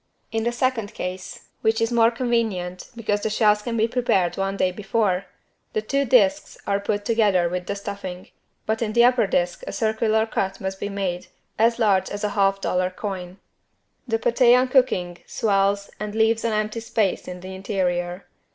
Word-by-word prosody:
In 225 0 -1
the 240 - +1
second 240 -4 -1
case, 180 0 -6 0.2
which 220 +1 +2
is 230 +1 +1
more 230 -1 +5
convenient 230 -7 -2
because 210 -3 -1
the 220 - -1
shells 210 -1 +3
can 230 +1 -3
be 220 +1 +3
prepared 230 -7 +1
one 195 0 -2
day 185 - +2
before, 195 -1 -1 0.5
the 215 - 0
two 275 +5 0
disks 210 -6 +3
are 200 0 +1
put 205 0 -2
together 205 -6 +3
without 180 +1 -4
the - - -2
stuffing, 200 -3 -7 0.4
but 220 +1 -1
in 215 -2 -1
the 235 - +5
upper 245 -3 +4
disk 175 -1 0
a - - -3
circular 220 0 +1
cut 195 -3 -2
must 190 0 -4
be 205 - -3
made 185 -3 -3 0.3
as 230 +1 +4
large 205 -5 +2
as 205 +1 -5
a 210 - +1
half 195 -1 +2
dollar 185 -1 0
coin. 185 -1 -6 0.7
The 225 -1 +1
paté 240 +1 +4
on 255 0 +1
cooking 185 -10 +2
swells 200 -1 +1
and 210 0 -5
leaves 225 +1 +2
an 230 -1 0
empty 215 +1 -1
space 220 -4 -1
in 180 0 -7
the 185 +1 -8
interior. 185 -2 -2
205 Hz, 185 wpm, -23 LUFS, 190-225 Hz, 0.7 s, more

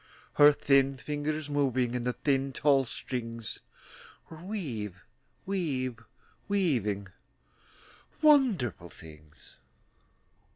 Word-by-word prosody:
Her 145 0 +8
thin 140 -1 +2
fingers, 150 +2 -3
moving 130 -4 0
In 125 -1 -3
the 125 - 0
thin, 135 -1 0
tall 140 -2 +3
strings, 115 -2 -5 0.7
Were 160 - -9
weav 155 - -5 0.5
weav 130 -11 -2 0.4
weaving 120 - 0 1.1
Wonderful 210 - +3
things. 75 -2 -15
135 Hz, 85 wpm, -29 LUFS, 115-150 Hz, 1.1 s, Her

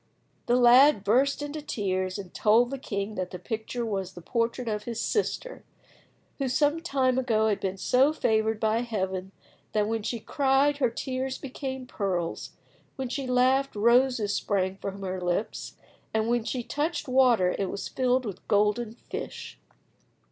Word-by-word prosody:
The 240 - +4
lad 250 0 +6
burst 265 +7 +2
into 295 +1 -5
tears, 185 -8 -2
and 190 -3 -8
told 230 +4 +3
the 275 - -4
king 200 -3 -3
that 185 -2 -3
the 180 - -7
picture 220 +5 -4
was 195 -4 -3
the 175 - -10
portrait 235 +2 -1
of 210 -1 -2
his 235 -2 -4
sister, - - -2 0.8
who 270 -2 0
some 295 +5 +2
time 260 -6 +1
ago 220 -4 +2
had 205 - 0
been 190 0 -3
so 260 +8 +3
favoured 220 -6 +1
by 220 +1 +2
Heaven 190 -5 -3 0.4
that 210 -1 +2
when 225 0 -1
she 235 +3 -3
cried 280 +3 +2
her 260 -4 +2
tears 260 +2 -3
became 265 -1 -6
pearls, 185 -8 -3 0.4
when 265 -2 -4
she 270 0 -3
laughed 260 +2 +2
roses 235 -1 +3
sprang 195 -1 -1
from 195 0 -6
her 185 -1 -3
lips, 180 +5 -2 0.4
and 220 0 +1
when 235 -1 +1
she 250 0 -2
touched 300 +5 -2
water 250 -8 +4
it 195 -2 -1
was 200 - -4
filled 255 0 +1
with 200 -4 -7
golden 210 +2 +2
fish. - - -7
235 Hz, 160 wpm, -27 LUFS, 200-260 Hz, 0.8 s, lad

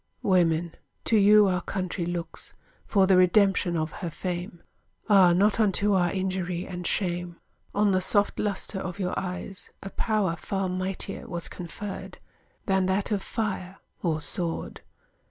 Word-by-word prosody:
Women, 170 -3 +2 0.3
to 225 - +3
you 210 0 +7
our 185 -2 +1
country 185 -3 -3
looks, 170 -1 -4 0.3
For 195 -3 +4
the 190 -1 +5
redemption 185 -1 +4
of 155 0 -1
her 175 - -2
fame: 175 0 -5 0.4
Ah, 195 -4 +7
not 200 +5 +3
unto 205 -1 +3
our 180 -2 +3
injury 185 -2 -2
and 180 -2 -5
shame, 175 -2 -1 0.4
On 205 0 +3
the 185 0 +2
soft 205 +2 +2
lustre 200 -1 -2
of 185 -1 -5
your 185 -2 -2
eyes 185 +1 -4
A 195 - -6
power 210 -6 0
far 195 +3 -2
mightier 185 +1 -3
was 170 -1 -4
conferred 190 +3 -7 0.5
Than 190 -3 +2
that 195 +3 0
of 205 -2 +1
fire 195 -4 -3 0.2
or 160 -3 0
sword! 170 +1 -4
185 Hz, 150 wpm, -27 LUFS, 175-195 Hz, 0.5 s, you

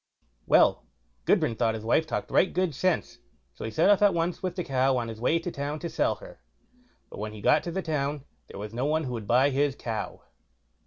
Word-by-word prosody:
Well, - - +4 0.4
Gudbrand 115 - +2
thought 115 -2 +2
his 110 - -6
wife 155 +7 +2
talked - - -3
right 190 - +3
good 185 -3 0
sense, 165 - -1 0.3
so - - -7
he - - -3
set 155 - +2
off 205 0 +5
at 205 -3 +5
once 170 +1 -1
with 185 -2 -3
the 180 - -2
cow 130 -2 +1
on 120 -2 -2
his 110 0 -8
way 155 +7 +3
to 170 +1 -4
town 145 +1 -4
to 170 +2 -5
sell 160 - +1
her; - - -13 0.7
but - - -9
when 105 0 -4
he 105 - -9
got 150 +8 +4
to 170 - -3
the 190 +2 -3
town, 145 -2 -2 0.2
there - - -10
was 105 +1 -6
no 125 +3 -1
one 155 +2 +1
who 125 -3 -4
would 110 -4 -5
buy 130 +4 +4
his 140 0 +1
cow. 110 -5 -5
145 Hz, 230 wpm, -27 LUFS, 115-170 Hz, 0.7 s, off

